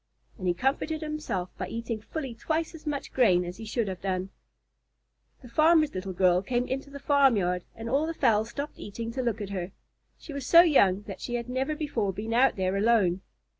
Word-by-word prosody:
And 185 - -3
he 175 - +2
comforted 295 - -1
himself 305 - -4
by - - -3
eating 230 -1 -4
fully 270 +2 -5
twice 315 +9 -2
as 315 -1 -11
much 285 -1 -3
grain 185 -9 +4
as 175 +1 -7
he 225 - -8
should 220 0 -1
have 185 -2 -5
done. 190 0 -2 1.1
The - - -10
farmer's 310 +4 +4
little 190 +1 -4
girl 180 -1 +3
came 245 +4 -1
into 270 +2 -4
the 280 - -8
farmyard, 225 - +2
and 225 +1 -7
all 280 +6 +1
the 330 - -4
fowls 220 -3 +2
stopped 285 +4 -6
eating 230 +3 -6
to 260 +2 -3
look 235 -3 -1
at 200 -1 -5
her. 185 -1 -4 0.4
She 300 - -10
was 280 -2 -5
so 335 - +9
young 205 - +4
that 200 -2 -8
she 240 - -3
had 235 0 -3
never 265 +4 -1
before 235 -10 -1
been 220 +4 -4
out 260 +3 +4
there 190 0 0
alone. 200 -4 +3
230 Hz, 205 wpm, -28 LUFS, 195-280 Hz, 1.1 s, so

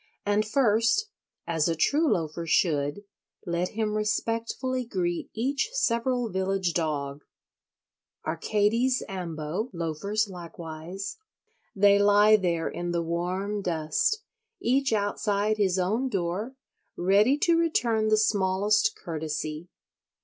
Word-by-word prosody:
And 205 +1 +2
first, 235 - +2 0.4
as 165 -2 +1
a 165 - 0
true 290 - +2
Loafer 165 0 -2
should, 150 +2 +1 0.4
let 175 0 -1
him 215 -1 0
respectfully 230 +4 -1
greet 180 -7 -2
each 275 - 0
several 245 - +1
village 190 -2 -1
dog. 145 -3 -2 1.0
Arcades 215 +10 +1
ambo—loafers 180 +3 -3
likewise—they 190 - -3
lie 205 +1 +6
there 170 -5 0
in 175 0 -4
the 170 -1 0
warm 185 +5 -2
dust, 165 - 0 0.4
each 265 +2 +1
outside 205 0 0
his 195 -3 +2
own 215 +9 0
door, 195 +5 -2 0.4
ready 205 +9 +4
to 340 +1 +3
return 240 -10 +1
the 215 0 +4
smallest 210 - +2
courtesy. 155 - -5
200 Hz, 105 wpm, -27 LUFS, 170-225 Hz, 1.0 s, lie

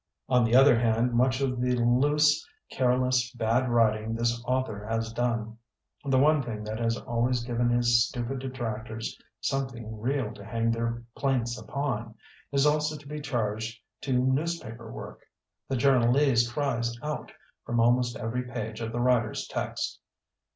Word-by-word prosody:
On 125 -2 +4
the 115 +1 +2
other 130 -2 +7
hand 115 +1 +2
much 130 +2 +2
of 125 -2 0
the 125 0 +2
loose, 145 +5 +3 0.3
careless, 125 -1 +2
bad 120 +2 +1
writing 110 -1 +2
this 120 0 0
author 125 -5 -1
has 115 0 -2
done 115 -2 -2 0.2
— - - -42
the 135 -1 +2
one 150 +2 +4
thing 110 -4 -5
that 110 +1 -4
has 115 0 0
always 120 +1 0
given 120 0 0
his 120 -1 +4
stupid 125 +2 -4
detractors 115 -4 -5 0.3
something 120 -4 -3
real 125 -2 -1
to 100 - -11
hang 115 +2 0
their 115 0 -2
plaints 125 -4 0
upon 120 -5 -3 0.2
— - - -28
is 140 0 +3
also 150 +1 +2
to 145 -1 -14
be 150 +1 -5
charged 115 -4 -2 0.2
to 135 - -2
newspi^r 130 -5 -2
woric - - -8 0.5
The 135 - 0
journalese 125 -1 +3
cries 120 -4 -1
out 150 0 -4 0.3
from 120 0 -1
almost 120 +1 +3
every 115 +3 -2
page 115 -2 -5
of 115 0 -3
the 120 - -3
writer's 120 -3 +1
text. - - -3
120 Hz, 160 wpm, -28 LUFS, 115-130 Hz, 0.5 s, other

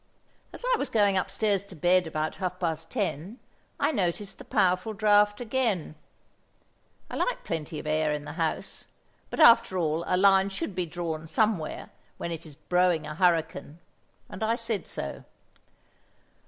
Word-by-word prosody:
As - - -8
I - - +3
was 280 - -2
going 205 -3 +3
upstairs 200 +1 0
to 200 -2 -11
bed 175 +2 +3
about 155 0 -3
half 185 -1 -3
past 165 -2 -2
ten, 200 - -3 0.4
I - - +2
noticed 195 - -2
the - - -9
powerful 190 +1 +1
draught 205 0 +3
again. 230 - -1 1.1
I - - -7
like - - -1
plenty 160 -2 -4
of - - -7
air 155 0 +1
in 150 0 -3
the 150 - -6
house, 160 +1 -3 0.4
but - - -6
after 230 -9 +6
all 160 -1 0
a 180 - +2
line 195 0 +5
should 195 +1 -4
be 180 -1 -2
drawn 160 -1 -4
somewhere 195 -2 -1 0.3
when 170 - -4
it 165 0 -6
is 150 - -13
blowing 175 +1 +1
a 150 - -5
hurricane, 165 -3 0 0.5
and - - -10
I 220 +1 +2
said 230 -6 -3
so. 70 - -5
180 Hz, 160 wpm, -27 LUFS, 160-205 Hz, 1.1 s, after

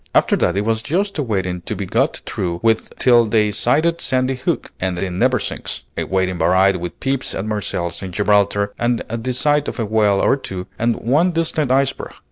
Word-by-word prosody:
After - - +4
that 90 +2 +1
it 100 - 0
was 110 0 0
just 185 - -1
a - - +2
waiting 95 -7 -2
to - - -5
be - - -4
got - - 0
through 90 -5 -3
with 115 -1 +1
till 120 -2 +5
they 105 -1 +2
sighted 155 +10 +1
Sandy 130 0 0
Hook 130 - -2
and 90 -1 -2
the 95 +1 -2
Neversinks, 120 +6 -1
a - - -2
waiting 95 -2 -1
varied 95 +3 +3
with 90 0 -7
peeps 135 0 -1
at 95 - -3
Marseilles 90 -5 -3
and 95 -2 -6
Gibraltar 100 +1 +2
and 120 0 0
the 115 +3 -3
sight 145 +3 +1
of - - -4
a 115 - 0
whale 105 -2 +2
or 135 - +3
two 95 -8 -6
and 115 0 +1
one 150 +10 +2
distant 160 -4 0
iceberg. 135 +1 0
110 Hz, 200 wpm, -19 LUFS, 95-130 Hz, -, till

